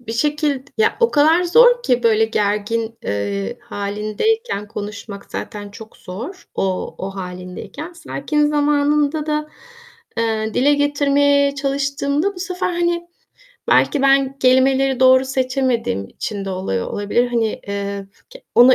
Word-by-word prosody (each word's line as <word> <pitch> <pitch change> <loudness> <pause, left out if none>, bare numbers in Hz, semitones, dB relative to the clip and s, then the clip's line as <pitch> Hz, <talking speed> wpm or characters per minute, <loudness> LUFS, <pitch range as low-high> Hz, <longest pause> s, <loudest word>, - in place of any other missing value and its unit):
bir 225 -2 -7
şekild 290 +1 0
ya 440 0 +3
o 465 - +4
kadar 320 +4 +4
zor 485 +6 +5
ki, 245 - +1
böyle, 225 -1 +4
gergin, 220 +1 -1
eee, 100 -1 -3
hâlindeyken 210 - -2
konuşmak 205 -1 -7
zaten 205 -1 -6
çok 220 +2 -12
zor 245 - -8
o, 190 -1 -2
o 190 - -4
hâlindeyken. 180 - -7
Sakin 300 -2 -1
zamanında 295 +1 +1
da, 300 0 -1 0.7
eee, 220 -1 -1
dile 285 +3 +4
getirmeye 285 -1 +2
çalıştığımda 280 +5 -1
bu 360 - -9
sefer, 365 0 -2
hani, 345 0 -1 0.6
belki 285 - +3
ben 275 0 +3
kelimeleri 265 0 +3
doğru 260 0 +6
seçemediğim 255 - -1
için 205 -2 -5
de 195 - -4
oluyor 185 - -2
olabilir. 205 +4 0
Hani, 230 -3 -1
eee, 200 0 -4 0.3
k - - -12
onu 250 +2 +8
260 Hz, 130 wpm, -19 LUFS, 210-295 Hz, 0.7 s, onu